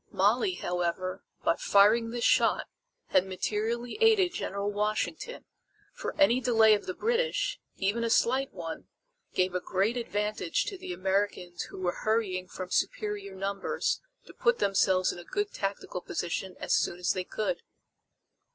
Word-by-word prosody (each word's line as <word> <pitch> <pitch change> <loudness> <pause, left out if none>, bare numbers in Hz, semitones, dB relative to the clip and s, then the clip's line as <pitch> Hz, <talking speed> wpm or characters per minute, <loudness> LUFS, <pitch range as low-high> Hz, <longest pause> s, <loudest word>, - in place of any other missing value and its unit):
Molly, 375 -4 +2
however, 180 +1 -2 0.2
by 165 - +2
firing 215 +3 +4
this 235 0 -3
shot - - +4 0.4
had - - +4
materially 220 - -2
aided 415 -6 +5
General 200 - -2
Washington, 215 - -2 0.5
for - - -6
any 260 -4 +5
delay 225 -3 +5
of 205 - -1
the 185 - -3
British, 485 +2 0 0.2
even 205 +4 0
a 230 - 0
slight 260 +4 +2
one, 165 -3 -7 0.5
gave 185 0 +2
a 180 - 0
great 200 +8 0
advantage 210 -6 -1
to 395 - -5
the 365 - -7
Americans 185 -1 -1
who - - -10
were 180 -1 -1
hurrying 205 -5 0
from 185 0 -7
superior 205 -2 -1
numbers 195 +1 -1 0.2
to - - -13
put 475 0 +2
themselves 190 -1 +3
in - - -8
a - - -9
good 410 - -2
tactical 195 -2 -3
position 180 +2 -3
as - - -1
soon 175 - +1
as 180 - +1
they 185 - -2
could. 215 +7 -2
205 Hz, 150 wpm, -29 LUFS, 185-235 Hz, 0.5 s, aided